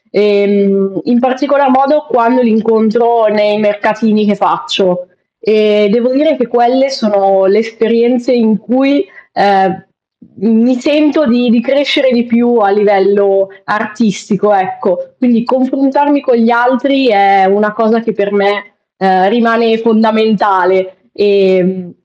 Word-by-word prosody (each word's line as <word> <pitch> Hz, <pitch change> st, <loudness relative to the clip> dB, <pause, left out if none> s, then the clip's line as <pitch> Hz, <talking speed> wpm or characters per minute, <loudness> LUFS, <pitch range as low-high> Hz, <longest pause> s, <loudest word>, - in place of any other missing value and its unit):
Ehm, 200 Hz, -2 st, 0 dB
in 245 Hz, -1 st, +1 dB
particolar 275 Hz, +2 st, 0 dB
modo 275 Hz, +3 st, +1 dB
quando 240 Hz, +1 st, +1 dB
li 235 Hz, -, +1 dB
incontro 225 Hz, +1 st, +1 dB
nei 210 Hz, 0 st, 0 dB
mercatini 215 Hz, +1 st, -1 dB
che 205 Hz, -1 st, 0 dB
faccio. 185 Hz, -8 st, -2 dB, 0.3 s
E 210 Hz, -1 st, +1 dB
devo 240 Hz, +3 st, 0 dB
dire 305 Hz, +2 st, +1 dB
che 245 Hz, -, -2 dB
quelle 240 Hz, +3 st, +1 dB
sono 200 Hz, -7 st, 0 dB
le 195 Hz, +2 st, +2 dB
esperienze 230 Hz, +3 st, -1 dB
in 220 Hz, -3 st, +1 dB
cui, 265 Hz, -, -1 dB, 0.3 s
ehm, 190 Hz, -1 st, 0 dB, 0.5 s
mi 225 Hz, +5 st, +1 dB
sento 300 Hz, +2 st, +1 dB
di 245 Hz, +1 st, +1 dB
di 235 Hz, +1 st, +2 dB
crescere 270 Hz, +1 st, 0 dB
di 240 Hz, -, +1 dB
più 240 Hz, 0 st, 0 dB
a 200 Hz, -2 st, +2 dB
livello 195 Hz, -1 st, +1 dB, 0.2 s
artistico, 210 Hz, -1 st, -2 dB
ecco. -, -, -3 dB
Quindi, 240 Hz, -3 st, +1 dB
confrontarmi 275 Hz, +3 st, 0 dB
con 260 Hz, -2 st, 0 dB
gli 230 Hz, 0 st, +2 dB
altri 250 Hz, +3 st, +1 dB
è 195 Hz, -2 st, +3 dB
una 210 Hz, +2 st, 0 dB
cosa 230 Hz, +1 st, 0 dB
che 225 Hz, -1 st, -4 dB
per 200 Hz, 0 st, -3 dB
me, 205 Hz, 0 st, -2 dB, 0.2 s
ehm, 190 Hz, 0 st, +1 dB
rimane 230 Hz, 0 st, +1 dB
fondamentale. 205 Hz, -4 st, 0 dB
Ehm 185 Hz, -3 st, 0 dB
220 Hz, 130 wpm, -11 LUFS, 200-245 Hz, 0.5 s, è